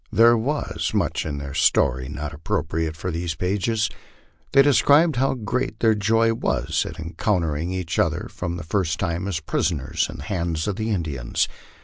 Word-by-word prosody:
There 115 +1 +6
was 140 +7 -2
much - - 0
in 75 -2 -3
their 70 0 -6
story 65 -3 +2
not 75 +1 -5
appropriate 80 +1 -2
for 90 +2 -3
these 85 0 -3
pages. 105 +4 0 0.6
They 135 0 +7
described 145 +2 +4
how 135 +1 +2
great 125 +1 -2
their 110 -1 +4
joy 115 +2 +2
was 115 - -1
at - - -8
encountering 85 -1 -1
each 90 -4 -2
other - - +1
for 90 - -4
the 85 0 -4
first 85 -1 -1
time 85 +1 -1
as 90 -5 -1
prisoners 80 -2 -1
in - - -7
the 70 - -8
hands 85 -1 -2
of 105 -1 -2
the 110 0 -2
Indians. 80 - -1
90 Hz, 170 wpm, -23 LUFS, 80-110 Hz, 0.6 s, They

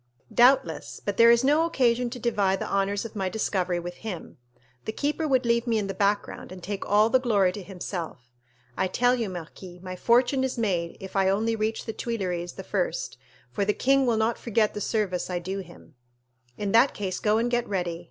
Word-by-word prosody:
"Doubtless; 260 +2 +3
but 205 -1 -2
there 230 0 +7
is 235 +1 +5
no 295 +4 +4
occasion 245 -7 +1
to 250 - -7
divide 205 -5 +1
the - - -3
honors 200 +2 0
of 225 - -8
my 190 -2 -1
discovery 185 -4 -1
with 175 +1 -7
him. 190 - -7 0.5
The - - -2
keeper 300 +6 -1
would 260 -3 +2
leave 235 +1 +1
me 230 -1 +2
in 210 - -1
the 195 - -4
background, 200 0 -1
and 185 -1 -10
take 200 0 -4
all 210 +2 +4
the 260 - +5
glory 205 -7 +2
to 205 - -7
himself. 175 -9 -7 0.4
I 190 - 0
tell 245 +6 +2
you, 235 -5 -1
marquis, 180 +1 -9
my 185 -1 -6
fortune 245 +6 +3
is 265 -1 -2
made 180 -7 -1
if 190 +1 -9
I 190 -1 +3
only 220 +4 +1
reach 220 +1 -2
the 225 - -4
Tuileries 180 -8 -3
the - - -8
first, - - -2 0.3
for 205 - -1
the 210 +1 +1
king 270 0 +3
will 230 -2 +2
not 220 +1 0
forget 220 -2 +1
the 210 - -5
service 200 -5 -1
I 180 - -1
do 190 +3 -4
him." 175 -3 -12 0.6
"In 205 -1 -2
that 235 +6 +4
case 190 -3 -3
go 215 0 +2
and 235 +2 0
get 240 -2 0
ready. 175 -4 -2
210 Hz, 210 wpm, -26 LUFS, 185-235 Hz, 0.6 s, there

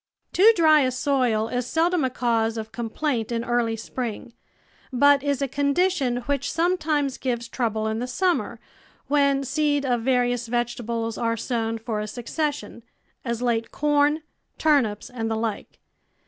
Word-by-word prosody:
Too 415 +5 +7
dry 315 -4 +6
a 260 -3 +2
soil 255 -4 +1
is 245 0 -2
seldom 335 +2 +1
a 260 - +1
cause 230 -2 0
of 220 0 -5
complaint 235 +1 -2
in 230 0 -1
early 240 -2 0
spring, 235 0 -5 0.6
but 285 +2 +5
is 285 -1 -1
a - - 0
condition 280 0 +1
which 280 +2 -2
sometimes 310 -5 0
gives 240 -3 -2
trouble 220 -3 -2
in 220 0 -1
the 250 - -3
summer, 360 +7 0 0.5
when 280 -1 +3
seed 290 +1 0
of 245 -3 +1
various 245 -1 +1
vegetables 235 -1 -2
are 230 -1 0
sown 225 -1 -2
for 225 -1 -4
a 210 - -3
succession 280 +4 -4 0.2
— - - -42
as 235 -1 -3
late 230 -2 0
corn, 295 +1 +2 0.3
turnips, 260 -10 +2
and 230 -3 -4
the 225 - -1
like. 220 -2 -4
250 Hz, 155 wpm, -24 LUFS, 230-285 Hz, 0.6 s, Too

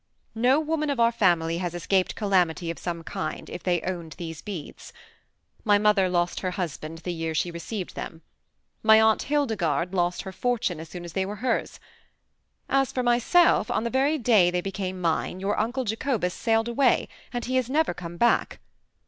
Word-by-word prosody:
No 250 +5 +3
woman 310 -1 -1
of 280 -4 -1
our 230 0 +5
family 170 -7 +2
has 175 -1 -3
escaped 185 +2 0
calamity 180 -5 +1
of 170 - -9
some 170 -2 -4
kind, 190 +3 -5
if - - -6
they 175 -2 +1
owned 170 -4 -4
these 165 -2 -7
beads. 190 -8 -8 0.7
My 205 -2 +4
mother 205 -2 +3
lost 175 -1 0
her 185 - -2
husband 165 -3 -5
the 180 - -3
year 165 -1 -3
she 175 +3 0
received 175 +3 -5
them. 165 - -7 0.6
My 220 0 +7
Aunt 220 0 +4
Hildegarde 195 - 0
lost 175 -1 0
her 190 - -6
fortune 220 -6 -1
as 160 0 -9
soon 175 -1 -8
as 170 - -9
they 190 - 0
were 200 +2 -4
hers. 240 - -1 0.9
As 270 -1 +2
for 255 - -1
myself, 245 - +4
on - - 0
the 235 - -2
very 275 +4 +2
day 220 -9 +4
they 180 0 0
became 190 -1 -4
mine 170 +1 -1
your 195 +2 0
Uncle 245 +5 -1
Jacobus 220 -4 -1
sailed 225 0 +1
away, 245 +1 +2 0.2
and 240 -1 -3
he 255 +1 0
has 255 -1 0
never 310 - +2
come 170 0 -8
back. 235 +6 +2
195 Hz, 185 wpm, -26 LUFS, 175-235 Hz, 0.9 s, My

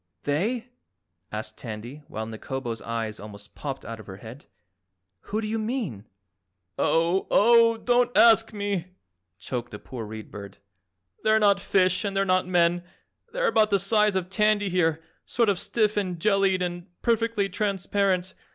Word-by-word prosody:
"They?" 215 - -1 0.7
asked 105 +1 -6
Tandy 120 +5 -7
while 110 +1 -5
Nikobo's 115 +1 -5
eyes 115 -2 -4
almost 105 -1 -11
popped 135 -2 -6
out 115 0 -7
of 110 - -12
her 95 - -8
head, 115 +7 -11 0.8
"Who 215 - -2
do - - -4
you 225 +1 -1
mean?" 215 - -3 0.7
"Oh, 170 +3 +2
oh, 230 +1 +5
don't 245 +1 +2
ASK 225 -1 +6
me!" 200 -4 -2 0.5
choked 120 +5 -5
the 105 - -8
poor 120 +2 -8
Read 110 0 -8
Bird. 100 -1 -9 0.7
"They're 215 0 +4
not 200 -2 +4
fish 185 -2 +2
and 200 -1 -2
they're 195 - +2
not 185 -1 +2
men. 175 -1 +2 0.5
They're - - -1
about 220 - +3
the 200 - +3
size 210 +1 +2
of 185 -2 -1
Tandy, 210 0 +2
here, 165 -3 +1 0.2
sort 235 -2 +2
of 195 -3 +1
stiff 215 -2 0
and 185 -4 -1
jellied 195 -1 +2
and 175 0 -4 0.2
perfectly 230 -3 +1
transparent. 195 -2 0
185 Hz, 155 wpm, -26 LUFS, 130-215 Hz, 0.8 s, ASK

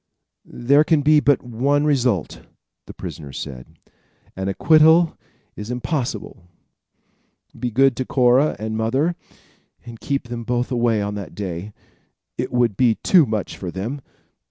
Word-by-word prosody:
"There 140 +5 +2
can 155 -2 +2
be 150 +1 +5
but 145 -1 +2
one 135 +5 0
result," 125 - 0 0.5
the - - -9
prisoner 70 -3 -8
said. 65 -2 -9 0.6
"An 95 0 -4
acquittal 160 - +4 0.4
is 105 +2 -8
impossible. 125 - -4 1.1
Be 125 - -2
good 135 +2 +3
to 130 - -2
Cora 130 +4 +3
and 110 +1 -4
mother, 130 +10 0 0.7
and 115 -2 -10
keep 140 -2 -3
them 120 -1 -5
both 120 +2 -2
away 120 -4 +1
on 100 0 -3
that 100 -2 -7
day. 95 0 -5 0.6
It - - -4
would 120 -4 +1
be 120 -1 +3
too 170 -7 +4
much 110 -3 -3
for 90 - -5
them. 110 +11 -5
120 Hz, 140 wpm, -21 LUFS, 105-140 Hz, 1.1 s, be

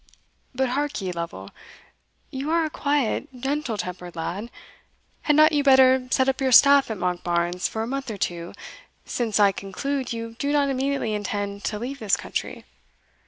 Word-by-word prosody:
But 260 0 +1
hark 290 +1 -2
ye, 190 -3 -3
Lovel; 170 - -6 0.8
you 270 +3 -4
are 330 0 +2
a 310 - -4
quiet, 285 -6 0
gentle 270 -3 -2
tempered 180 -2 -6
lad; 190 +7 -4 0.7
had 295 - +2
not 310 +1 +6
you 295 -2 +2
better 260 -2 +5
set 260 0 +2
up 270 0 0
your 265 -1 +1
staff 280 +2 +7
at 220 - -3
Monkbarns 175 0 -1
for 220 - -3
a - - -4
month 270 0 -4
or 215 - -5
two, 175 -2 -3 0.5
since 225 -4 -1
I 200 -1 +6
conclude 260 +9 -4
you 230 -1 -5
do 285 - -1
not 285 -1 +2
immediately 270 -4 -1
intend 205 -1 -3
to 210 - -2
leave 260 +5 -5
this 210 -4 +1
country? - - -5
240 Hz, 170 wpm, -24 LUFS, 200-275 Hz, 0.8 s, staff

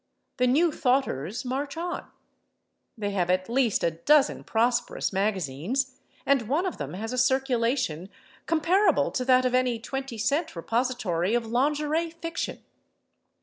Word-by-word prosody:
The 250 -1 +3
New 315 +7 +3
Thoughters 245 - 0
march 280 +4 -3
on; 350 +1 -4 0.9
they 205 -2 -2
have 180 -3 0
at 185 +1 +1
least 240 -2 +1
a 170 - +2
dozen 280 - +3
prosperous 235 -1 0
magazines, 195 - -1 0.3
and 265 -5 +2
one 315 +7 +1
of 370 - -3
them - - -5
has 225 +5 -4
a 255 - 0
circulation 250 - +1 0.4
comparable 340 +3 +3
to 255 - -1
that 255 0 +4
of 250 - +1
any 255 -2 +2
20 265 +2 -5
cent 285 - 0
repository 220 -2 0
of 240 -1 0
lingerie 300 +7 0
fiction. 330 0 -5
250 Hz, 140 wpm, -26 LUFS, 220-280 Hz, 0.9 s, that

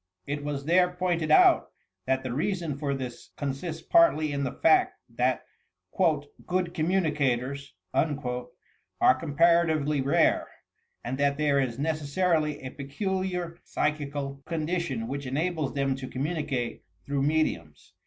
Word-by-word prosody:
It 145 +1 -3
was 145 -1 -3
there 180 +3 +4
x>ointed 180 -3 -1
out 155 - +6 0.4
that 130 0 +1
the 130 -2 -3
reason 170 0 -1
for 140 -1 -2
this 130 -3 -7
consists 155 +4 -4
partly 335 - +4
in 140 0 -1
the 130 - -1
fact 370 +2 +3
that - - 0 0.5
''good 185 - 0
communicators" 140 - 0 0.2
are - - +3 0.9
comparaitivdy 155 0 +3
rare, 140 - +3 0.6
and 130 +3 -4
that 140 0 +2
there 145 -2 +2
is 125 -3 -1
necessarily 155 +1 0
a 130 - -5
peculiar 180 +3 -3
psychical 140 -2 -2
condi 165 +2 -1
tion 130 -9 -3
which 140 +1 -4
enables 155 +2 -1
them 135 -1 +1
to 130 -1 -6
communicate 140 -3 -3 0.2
through 140 -1 -1
mediums. 140 - -1
150 Hz, 125 wpm, -27 LUFS, 140-170 Hz, 0.9 s, out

